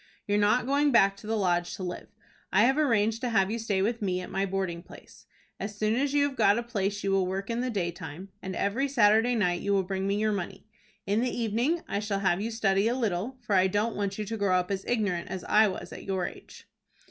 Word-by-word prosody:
You're 205 Hz, 0 st, +1 dB
not 210 Hz, +5 st, +3 dB
going 285 Hz, +2 st, +2 dB
back 195 Hz, -5 st, +5 dB
to 210 Hz, -, -11 dB
the 225 Hz, 0 st, 0 dB
Lodge 175 Hz, -3 st, 0 dB
to 190 Hz, -, -7 dB
live. 180 Hz, -1 st, -5 dB, 0.4 s
I 205 Hz, -, +5 dB
have 265 Hz, +3 st, +4 dB
arranged 225 Hz, -5 st, +2 dB
to 250 Hz, -, -1 dB
have 195 Hz, -3 st, +2 dB
you 230 Hz, -, -2 dB
stay 205 Hz, -4 st, 0 dB
with 230 Hz, +2 st, -1 dB
me 185 Hz, -3 st, 0 dB
at 180 Hz, -, -8 dB
my 195 Hz, +1 st, 0 dB
boarding 185 Hz, -3 st, -2 dB
place. -, -, -16 dB, 0.3 s
As 205 Hz, +1 st, -5 dB
soon 215 Hz, +1 st, +1 dB
as 275 Hz, +3 st, 0 dB
you 285 Hz, 0 st, +3 dB
have 275 Hz, -, -7 dB
got 205 Hz, -3 st, +4 dB
a 240 Hz, -, -1 dB
place 205 Hz, -3 st, -2 dB
you 195 Hz, -, 0 dB
will 195 Hz, -1 st, +2 dB
work 195 Hz, +4 st, -3 dB
in 230 Hz, -, -1 dB
the 255 Hz, -, -1 dB
daytime, 175 Hz, -3 st, -4 dB
and 190 Hz, 0 st, -5 dB
every 235 Hz, +8 st, 0 dB
Saturday 230 Hz, -2 st, +4 dB
night 180 Hz, -5 st, +1 dB
you 200 Hz, -, 0 dB
will 195 Hz, -1 st, +2 dB
bring 190 Hz, +1 st, -3 dB
me 200 Hz, -, +1 dB
your 215 Hz, 0 st, +1 dB
money. 195 Hz, -1 st, -5 dB, 0.4 s
In 205 Hz, +3 st, +1 dB
the 250 Hz, -, +1 dB
evening 240 Hz, +9 st, 0 dB
I 200 Hz, -, -1 dB
shall 205 Hz, -2 st, -2 dB
have 190 Hz, -1 st, +1 dB
you 220 Hz, -, -2 dB
study 210 Hz, -3 st, +1 dB
a 240 Hz, -, +1 dB
little, 225 Hz, +2 st, -2 dB
for 220 Hz, -, -3 dB
I 185 Hz, 0 st, +5 dB
don't 210 Hz, +4 st, 0 dB
want 200 Hz, -1 st, -2 dB
you 215 Hz, -, -3 dB
to 225 Hz, +2 st, -4 dB
grow 195 Hz, -3 st, +2 dB
up 180 Hz, +1 st, -2 dB
as 195 Hz, -1 st, -2 dB
ignorant 200 Hz, -8 st, -1 dB
as 185 Hz, -2 st, -5 dB
I 215 Hz, +1 st, +4 dB
was 190 Hz, -, -6 dB
at -, -, -9 dB
your 190 Hz, -2 st, -1 dB
age." -, -, -10 dB
205 Hz, 250 wpm, -28 LUFS, 190-230 Hz, 0.4 s, back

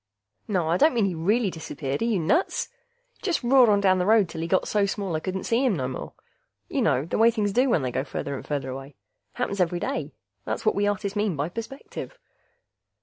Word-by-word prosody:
Naw, 185 Hz, -6 st, 0 dB
I 170 Hz, -, +3 dB
don't 305 Hz, +6 st, +4 dB
mean 225 Hz, -4 st, +3 dB
he 190 Hz, -, 0 dB
really 200 Hz, +6 st, +1 dB
disappeared 150 Hz, -3 st, -4 dB
are -, -, +2 dB
you 230 Hz, -3 st, +1 dB
nuts? 245 Hz, -, +1 dB, 0.5 s
Just 355 Hz, -8 st, -1 dB
roared 250 Hz, -1 st, +6 dB
on 205 Hz, -1 st, +4 dB
down 190 Hz, -2 st, +3 dB
the 180 Hz, -, +1 dB
road 215 Hz, -3 st, +5 dB
till 165 Hz, -1 st, -6 dB
he 165 Hz, -, -2 dB
got 185 Hz, +2 st, +1 dB
so 205 Hz, -2 st, +2 dB
small 195 Hz, -4 st, -2 dB
I -, -, 0 dB
couldn't 185 Hz, +3 st, -4 dB
see 235 Hz, +3 st, +1 dB
him 250 Hz, -7 st, +2 dB
no 130 Hz, -5 st, -2 dB
more. 130 Hz, -, -6 dB, 0.6 s
You -, -, 0 dB
know 130 Hz, +3 st, +2 dB
the 170 Hz, -, -2 dB
way 225 Hz, +1 st, +7 dB
things 210 Hz, -4 st, -1 dB
do 255 Hz, +4 st, +3 dB
when 160 Hz, -, +2 dB
they 125 Hz, -, -1 dB
go 130 Hz, -, -1 dB
farther 140 Hz, 0 st, -4 dB
and -, -, -6 dB
farther 140 Hz, -3 st, -3 dB
away. 135 Hz, +1 st, -8 dB, 0.4 s
Happens 200 Hz, -6 st, -2 dB
every 175 Hz, 0 st, +1 dB
day; 275 Hz, +9 st, -3 dB, 0.3 s
that's -, -, -4 dB
what -, -, +3 dB
us 205 Hz, 0 st, +1 dB
artists 200 Hz, 0 st, -3 dB
mean 205 Hz, -4 st, 0 dB
by 145 Hz, +3 st, -2 dB
perspective. 230 Hz, -, -7 dB
195 Hz, 230 wpm, -25 LUFS, 160-225 Hz, 0.6 s, way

